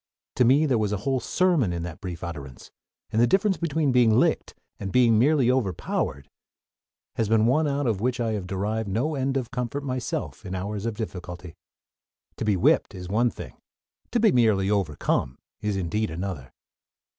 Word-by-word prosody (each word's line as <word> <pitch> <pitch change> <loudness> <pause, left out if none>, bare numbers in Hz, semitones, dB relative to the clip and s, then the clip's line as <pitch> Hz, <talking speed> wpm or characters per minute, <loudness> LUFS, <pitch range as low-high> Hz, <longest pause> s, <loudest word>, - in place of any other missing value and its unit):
To 125 - +5
me 140 +6 +5
there 130 -6 +2
was 105 -2 0
a 105 - 0
whole 135 -1 +1
sermon 170 - +1
in 85 -1 -3
that 85 -2 -7
brief 90 -3 -6
utterance, 70 -7 -8 0.4
and 110 - +2
the 120 - +5
difference 195 - +2
between 160 -3 0
being 125 -2 +5
"licked" - - +1 0.2
and 95 -1 -4
being 115 -2 +4
"merely 135 -1 +4
overpowered" 90 - -2 0.9
has 110 -2 0
been 110 -1 +4
one 150 +6 +3
out 140 0 -1
of 110 -5 0
which 125 +1 0
I 115 -2 0
have 100 -4 -3
derived 100 +3 -2
no 125 +11 0
end 135 -1 -1
of 125 -4 -4
comfort 125 +2 -3
myself 130 +3 -4
in 95 -2 -5
hours 100 +3 -3
of 115 - -3
difficulty. 90 -5 -7 0.8
To - - -3
be 105 -3 +2
whipped - - +2
is 90 -1 -7
one 115 +5 +2
thing; - - -10 0.5
to 240 - +1
be 220 -2 +5
merely 105 -5 +3
overcome 75 -8 0 0.2
is 105 -2 -1
indeed 105 +4 -1
another! 85 -6 -5
110 Hz, 180 wpm, -25 LUFS, 95-130 Hz, 0.9 s, To